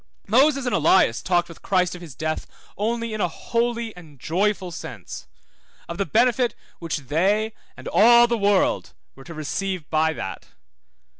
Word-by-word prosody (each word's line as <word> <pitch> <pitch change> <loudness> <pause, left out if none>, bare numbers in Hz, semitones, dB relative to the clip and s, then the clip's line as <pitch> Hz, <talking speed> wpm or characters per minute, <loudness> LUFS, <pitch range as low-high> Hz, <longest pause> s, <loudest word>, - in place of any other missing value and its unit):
Moses 270 +5 +3
and 245 - -1
Elias 155 -6 +3
talked 175 -1 +1
with 170 - -13
Christ 180 -2 +1
of 180 - -9
his 160 -7 -10
death 155 +2 -3 0.3
only 230 +2 -2
in 215 - -3
a - - +2
holy 235 +5 -2
and 155 -6 -15
joyful 190 +4 -1
sense, - - -8 0.6
of 170 +2 -7
the 195 - 0
benefit 240 0 +2 0.2
which 165 -2 -3
they 190 - 0 0.2
and - - -10
all 235 +2 +6
the 240 0 0
world 200 -3 +1 0.2
were 135 - -15
to 170 - -9
receive 175 +3 -3
by 160 0 +2
that. 95 -10 -7
190 Hz, 160 wpm, -23 LUFS, 165-230 Hz, 0.6 s, all